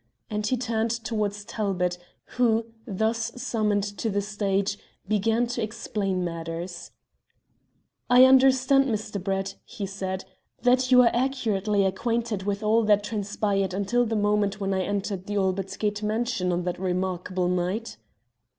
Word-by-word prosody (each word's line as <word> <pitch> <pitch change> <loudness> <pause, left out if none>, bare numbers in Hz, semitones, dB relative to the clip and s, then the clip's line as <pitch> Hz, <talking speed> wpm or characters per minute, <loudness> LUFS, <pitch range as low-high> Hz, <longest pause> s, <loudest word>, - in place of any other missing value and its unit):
And 210 0 -1
he 255 - +1
turned 230 -2 -1
towards 215 -3 -2
Talbot, 180 -5 -1 0.3
who, 230 -2 +2 0.2
thus 220 +2 -1
summoned 215 -5 0 0.2
to 225 - 0
the 205 0 0
stage, 200 -1 -1 0.3
began 220 +3 +2
to 240 0 -3
explain 205 -4 -2
matters. 170 +1 -5 1.2
"I 250 +1 +8
understand, 265 +1 +5
Mr. 215 -5 -3
Brett," 195 0 -2
he 200 - -6
said, 190 -1 -4 0.4
"that 255 +1 +3
you 250 0 +8
are 235 - +4
accurately 215 -6 +1
acquainted 225 +1 -1
with 200 +1 -1
all 220 +2 +4
that 205 -1 +4
transpired 205 -2 -1
until 205 +5 +1
the 225 -1 -1
moment 205 -1 +1
when 195 -1 -1
I 190 - +1
entered 195 -1 -3
the 205 - -3
Albert 195 0 -1
Gate 210 0 -1
mansion 215 -3 0
on 175 0 -1
that 180 0 -3
remarkable 185 0 -1
night?" 180 - -2
210 Hz, 140 wpm, -26 LUFS, 190-230 Hz, 1.2 s, I